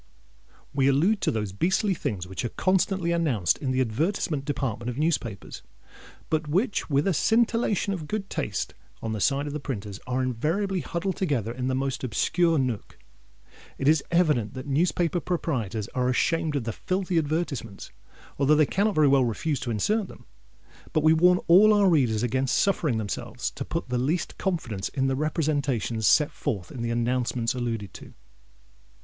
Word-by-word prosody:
We 135 -1 +2
allude 170 +10 +3
to - - +1
those 105 -3 -2
beastly 190 - +1
things 100 - -3
which 95 +3 -5
are 120 - -1
constantly 185 - +1
announced 140 - +1
in 135 - -2
the 130 0 +1
advertisement 145 - -1
department 125 -5 -2
of 125 - -5
newspapers, 135 - -2 0.7
but 155 -1 -1
which, 190 - 0
with 140 0 +2
a 195 - +3
scintillation 225 +1 +2
of 160 -5 -5
good 210 +1 -3
taste - - -3 0.3
on 115 - -2
the 110 - -3
side 140 +4 +2
of 145 - -5
the 150 - -3
printers, 105 -8 -5
are 130 +1 0
invariably 165 - -1
huddled 175 +2 -3
together 135 - -1
in 125 +1 -3
the 130 - 0
most 135 -1 -2
obscure 165 - +1
nook. 125 -6 -2 0.8
It 135 - -1
is 155 -1 +4
evident 150 - +2
that 130 - -6
newspaper 170 +3 +1
proprietors 125 - -2
are 125 0 0
ashamed 160 +4 +1
of 140 - 0
the 115 -1 -3
filthy 185 - -1
advertisements, 145 - -3 0.5
although 145 +2 +4
they 155 0 +5
cannot 200 +6 0
very 155 -1 +5
well 135 -1 +5
refuse 135 +6 -1
to 120 - -5
insert 200 - 0
them. - - -14 0.7
But 155 - +2
we 160 0 +6
warn 180 +3 +5
all 210 +5 +7
our 205 -1 +4
readers 125 - +2
against 130 +1 +1
suffering 160 - +1
themselves 105 -2 -4
to - - -5
put 165 -6 -4
the 125 0 0
least 150 +8 -1
confidence 125 - -2
in 135 -1 -1
the 135 0 +1
representations 140 - 0
set 155 0 +4
forth 105 -12 -4
in 125 - -6
the 120 - -2
announcements 120 0 0
alluded 115 -5 -3
to. - - -12
140 Hz, 175 wpm, -26 LUFS, 120-170 Hz, 0.8 s, all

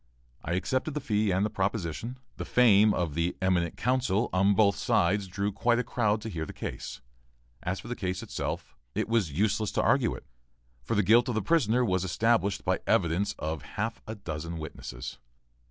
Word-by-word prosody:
I 85 - -2
accepted 130 - -1
the - - 0
fee 110 -6 0
and 95 +3 +1
proposition. 100 +4 -2 0.2
The - - -3
fame 110 -4 +5
of 85 -6 -1
the 85 +3 -1
"eminent 90 -3 +1
counsel" 125 -4 +1
on 100 +2 +4
both 100 -2 +4
sides 100 0 +1
drew 100 +3 -2
quite 120 +4 +2
a 125 - +1
crowd 110 -4 0
to 110 - -5
hear 85 -6 -3
the - - -8
case. - - -6 0.6
As 90 +2 -2
for - - -10
the 120 - -3
case 95 -5 -3
itself, - - -4 0.2
it - - 0
was 110 -8 +1
useless 105 +5 +1
to - - +2
argue - - +3
it, - - -11 0.6
for 115 - -2
the 105 - +3
guilt 120 +6 +5
of 120 - -1
the 110 - +1
prisoner 125 - +3
was 95 -3 +1
established 100 +2 +1
by - - +1
evidence 95 +5 +2
of 80 -1 -3 0.2
half 115 +2 -2
a 110 - -4
dozen 85 -4 -5
witnesses. 70 -4 -7
100 Hz, 185 wpm, -29 LUFS, 90-115 Hz, 0.6 s, fame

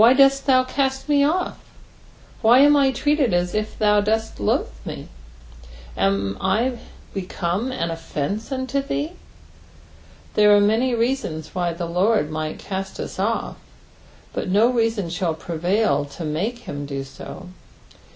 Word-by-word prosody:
"Why 235 +3 +8
dott 275 0 +5
thou 255 -1 +5
eatt 265 +1 -1
me 290 -1 +4
off?" 340 +6 0 0.8
Wby 240 +4 +7
am 290 0 +6
I 275 -2 +4
treated 285 - +1
as 175 0 0
if 215 0 -2
thou 210 -1 +4
didst 220 +2 -1
loathe 100 - 0
me - - -5
t - - -10 0.9
Am 100 +2 0
I 230 +6 +1 0.3
become 190 +4 -2
an 170 -10 -2
offence 165 - -4
unto 260 +1 -1
tbee? 290 +3 -3 1.2
There 210 -1 +6
are - - +6
many 225 +5 +2
reasons 230 - -2
why 175 -2 -1
the 170 +1 -4
Lord 180 -1 +1
might 155 0 -3
cast 195 0 -5
US - - -6
off, 220 +4 -1 0.8
but - - -3
no 215 +6 +4
reason 225 -5 0
shall 170 -2 -1
prevail 170 -2 0
to 145 +4 -8
make 180 +11 -2
him 145 0 -5
do 135 -1 -4
so. 135 +6 -10
210 Hz, 150 wpm, -22 LUFS, 170-255 Hz, 1.2 s, Why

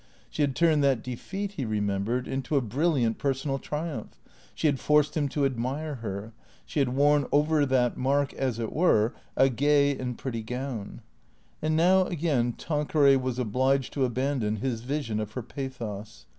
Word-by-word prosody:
She - - -3
had 140 -3 +1
turned 155 -3 +3
that 135 -5 +2
defeat, 195 +11 -5
he 140 - -1
remembered, 105 +3 -1
into 135 +3 -2
a 140 - +4
brilliant 125 -1 0
personal 135 0 -1
triumph; 150 -6 -5 0.4
she - - -3
had 140 -3 +3
forced 150 0 +3
him 145 -3 0
to 145 0 0
admire 135 +4 -2
her; 105 +1 -5 0.3
she - - -3
had 135 -3 +2
worn 145 0 +4
over 150 0 +3
that 125 -2 +2
mark, 140 +2 +1
as 130 -4 -2
it 115 -1 -3
were, 120 -9 +3 0.2
a 135 - +6
gay 140 +2 +3
and 125 -2 -4
pretty 115 -4 -4
gown. 125 -2 -5 0.6
And 155 0 +1
now, 185 +3 +5
again, 145 -9 0
Tanqueray 150 -2 +2
was 130 -1 -2
obliged 130 +3 +1
to 140 - 0
abandon 125 -3 0
his 115 0 -2
vision 125 -4 -2
of 105 0 -4
her 125 - -4
pathos. 115 -6 -7
135 Hz, 170 wpm, -27 LUFS, 120-145 Hz, 0.6 s, a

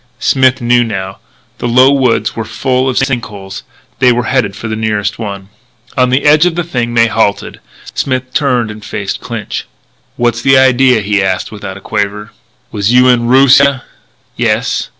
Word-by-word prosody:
Smith 130 0 +2
knew 120 0 +3
now. 95 -4 -5 0.4
The - - -2
low 130 +3 +5
woods 130 -4 +1
were 115 - -3
full 130 +4 -1
of 125 - -2
sink 135 -3 0
holes. 95 -3 -9 0.4
They 125 -1 +4
were 120 0 0
headed 120 -5 -1
for 115 - -7
the 110 - -3
nearest 110 -1 -2
one. 100 -3 -6 0.5
On 125 -1 +2
the 130 +2 +1
edge 150 +3 +5
of 170 - -2
the 175 - -1
thing 120 -7 -3
they 115 0 +5
halted. 110 -2 -1 0.3
Smith 130 -1 -3
turned 125 -7 0
and 105 0 -11
faced 100 -2 -5
Clinch. - - -6 0.5
"What's 120 -1 0
the 135 +1 +4
idea?" 130 -2 +4
he 100 0 0
asked 95 -1 -2
without 105 -3 -8
a - - -13
quaver. 105 0 -3 0.4
"Was 100 +2 -1
you 125 +1 +5
in 120 -1 +2
Roosia?" 135 +1 +4 0.5
"Yes." - - -1
120 Hz, 175 wpm, -12 LUFS, 105-130 Hz, 0.5 s, low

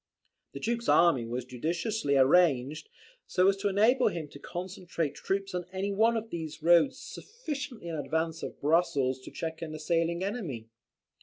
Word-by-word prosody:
The - - -6
Duke's 235 +1 -1
army 150 -9 +4
was 120 +1 -4
judiciously 155 - -1
arranged, 140 - +3 0.4
so 185 +1 +3
as 195 - +2
to 200 +1 -1
enable 225 +6 +4
him 165 -3 -3
to 140 - -12
concentrate 175 -3 -4
troops 195 0 -3
on 180 -1 -3
any 195 +2 -2
one 225 +3 +3
of 225 0 -5
these 160 -2 -6
roads 175 - +5
sufficiently 290 - -7
in 165 - -3
advance 160 +3 -2
of - - -6
Brussels 140 -4 +2
to 130 - -11
check 160 -1 -5
an 155 -2 -5
assailing 165 +2 0
enemy. 170 - -4
170 Hz, 160 wpm, -29 LUFS, 150-200 Hz, 0.4 s, roads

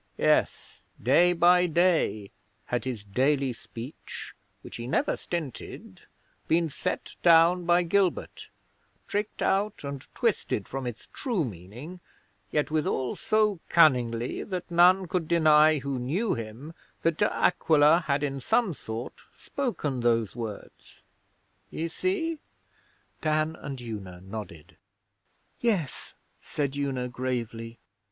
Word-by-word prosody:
Yes, - - +1 0.2
day 160 +9 +4
by 180 +1 +5
day 160 - +1 0.3
had 120 0 -2
his 120 -5 -4
daily 130 +5 +1
speech, 120 +4 -9 0.3
which - - -9
he 120 0 -6
never - - +1
stinted, 160 -8 -6 0.5
been 165 0 +2
set 180 +5 -4
down 170 +1 +5
by 175 +1 +4
Gilbert, 185 +1 0 0.6
tricked 205 +1 -2
out 200 -1 0
and 140 -2 -6
twisted 100 - 0
from 135 -1 -4
its 120 -2 -7
true 230 - -1
meaning, 115 - -9 0.5
yet 150 0 0
withal 150 -5 0
so 215 -3 +1
cunningly 125 -7 +3
that 180 -2 -5
none 180 +2 +5
could 170 -1 -1
deny 155 -2 +5
who 135 -1 -3
knew 170 - 0
him 115 +8 -7 0.3
that 165 -1 +2
De 205 - +2
Aquila 160 0 +4
had 140 0 +1
in 140 -1 -2
some 210 - +2
sort 115 -3 -7
spoken 185 - -3
those 115 -3 +1
words. 115 -4 -8 0.7
Ye 165 - -3
see?' 330 - -2 0.8
Dan 155 0 +1
and 135 -4 -7
Una 100 -7 -7
nodded. 95 -5 -9 0.8
'Yes,' 200 - -1 0.2
said 140 -2 -3
Una 135 -3 -2
gravely. 120 -2 -4
150 Hz, 120 wpm, -27 LUFS, 120-175 Hz, 0.8 s, by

